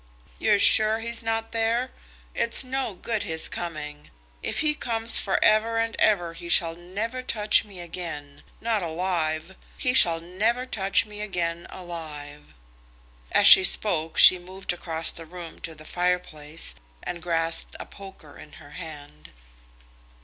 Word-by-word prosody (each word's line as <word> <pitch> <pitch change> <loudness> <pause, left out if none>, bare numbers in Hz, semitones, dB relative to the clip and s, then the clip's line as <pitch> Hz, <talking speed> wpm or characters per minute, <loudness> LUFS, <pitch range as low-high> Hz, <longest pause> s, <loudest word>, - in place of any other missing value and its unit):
"You're 210 -2 +3
sure 215 +2 +5
he's 230 +1 -5
not 225 0 -3
there? 230 +3 -1 0.4
It's 235 +2 +1
no 260 -5 -3
good 220 +3 -3
his 160 0 -1
coming. 150 -4 -7 0.3
If - - -3
he 305 -1 +1
comes 230 -5 +3
for 195 - -1
ever 220 +2 +3
and 230 0 -1
ever 175 -6 +2
he 170 +1 -7
shall 165 -1 +4
never 205 +9 -5
touch 215 -4 +3
me 200 -4 -12
again; 165 -5 -8 0.2
not 225 -2 -1
alive; 165 0 -3 0.2
he 250 -2 0
shall 170 -10 +6
never 215 +9 -1
touch 195 -5 +2
me 210 -1 -8
again 170 -4 -3
alive." 150 - -9 0.8
As - - +3
she 190 - +10
spoke 170 -4 +1
she 185 - +8
moved 185 +1 -5
across 165 -2 -2
the 165 -1 -11
room 175 0 -10
to 165 - -7
the 155 0 -12
fire 180 +2 0
place 155 - -9 0.3
and 175 -1 -6
grasped 165 -1 -2
the - - -8
poker 190 -7 -14
in 150 - -14
her 145 -2 -15
hand. 145 - -11
180 Hz, 150 wpm, -24 LUFS, 165-220 Hz, 0.8 s, she